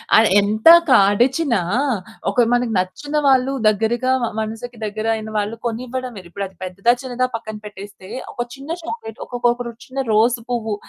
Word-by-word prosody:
ఆ! - - +8 0.2
ఎంత 215 +6 0 0.2
కాడిచిన 245 +6 +4 0.8
ఒక 245 - +3
మనకు 245 -2 +1
నచ్చిన 290 +11 -4
వాళ్ళు 265 0 +4 0.2
దగ్గరగా 225 +4 +1 0.3
మనసుకి 225 +2 -5
దగ్గరయిన 220 +1 -2
వాళ్ళు 210 +2 -1
కొనివ్వడమే, 245 -2 -4
ఇప్పుడది 195 0 -6
పెద్దదా, 195 +6 +1
చిన్నదా 255 -1 -1
పక్కన 220 -1 -6
పెట్టేస్తే 200 -1 -10 0.2
ఒక 240 - -3
చిన్న 275 +3 -11
చాక్లేట్, 225 -9 -7
ఒకొక 245 -1 -6
ఒక 245 - -9
రోజు 235 -1 -10
చిన్న 270 +1 -3
రోసు 230 +2 +3
పువ్వు 225 -3 -1
230 Hz, 145 wpm, -20 LUFS, 210-250 Hz, 0.8 s, ఆ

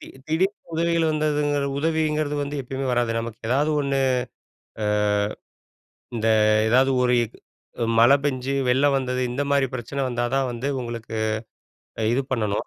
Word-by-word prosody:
தி - - -11 0.2
திடீர்னு 185 +3 -1
உதவிகள் 165 -1 +1
வந்ததுங்குற 145 -2 0
உதவிங்கிறது 155 -1 0
வந்து 145 +1 -4
எப்பயுமே 135 +2 -4
வராது 120 -1 +1
நமக்கு 115 0 -7
ஏதாவது 145 +5 +2
ஒண்ணு, 140 -1 0 0.8
அ - - 0 1.3
இந்த 115 0 0 0.4
எதாவது 130 +2 +4
ஒரு 125 0 +2
இ - - +1 0.6
அ - - +3
மழை 120 +5 +7
பெஞ்சு 130 -1 -1 0.2
வெள்ளம் 140 +3 +3
வந்தது 125 -1 -2
இந்த 145 - -1
மாரி 140 -1 +3
பிரச்சனை 130 +3 -4
வந்தாதான் 125 +2 0
வந்து 120 +4 -3
உங்களுக்கு 115 -2 -6 1.0
இது 135 - +1
பண்ணணும். 105 -5 -1
135 Hz, 135 wpm, -24 LUFS, 120-150 Hz, 1.3 s, மழை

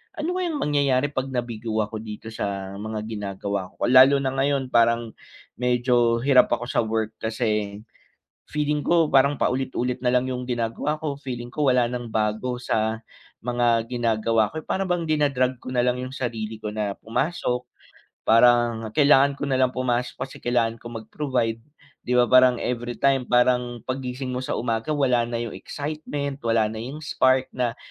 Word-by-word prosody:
ano 335 +3 -2
kayang 335 -5 -2
mangyayari 140 -1 +1
'pag 130 -2 -2
nabigo 115 -3 -3
ako 110 +1 -6
dito 110 0 -8
sa 100 -2 -4
mga 110 0 -4
ginagawa 100 -2 -4
ko. - - -6
Lalo 130 +3 +7
na 130 - 0
ngayon 135 -1 0
parang 115 0 +3 0.5
medyo 120 -1 +2
hirap 135 -2 +6
ako 120 - -7
sa - - 0
work, 110 0 -1
kasi 105 -3 -2 0.7
feeling 150 0 0
ko 165 -3 +3
parang 140 +1 +5
paulit-ulit 125 -1 -1
nalang 125 0 +2
yung 125 0 -4
ginagawa 120 +4 -1
ko, 145 -3 -3
feeling 120 -3 -6
ko 150 +2 -1
wala 125 -1 +4
nang 120 -1 -4
bago 110 +3 -1
sa 110 -2 -1 0.4
mga 120 -1 +2
ginagawa 115 -2 +1
ko, 160 - -4
or - - -25
para 195 - -1
bang 175 -2 0
dina-drag 135 -4 +1
ko - - -10
nalang 125 0 +1
yung 130 - -9
sarili 115 -3 -3
ko 105 - -3
na 105 -2 -2
pumasok. 125 0 -2 0.6
Parang 115 0 +4
kailangan 140 -1 +5
ko 145 - -4
nalang 130 -1 +2
pumasok 125 -1 -1
kasi 135 - -11
kailangan 115 -2 0
ko - - -9
mag-provide 115 0 -2 0.4
'di 125 0 +1
ba, 120 - +5
parang 130 0 +5
everytime 125 +3 0
parang 125 0 +2
'pag 130 +1 -3
gising 130 +1 -4
mo 125 - -3
sa - - -2
umaga 115 +2 -2
wala 130 -4 +2
na 120 -1 -2
yung 115 -2 -4
excitement, 145 -1 -4
wala 115 -1 +2
na 110 +1 -5
yung 135 +5 -6
spark 130 -3 +2
na 125 -2 -1
125 Hz, 165 wpm, -24 LUFS, 115-135 Hz, 0.7 s, Lalo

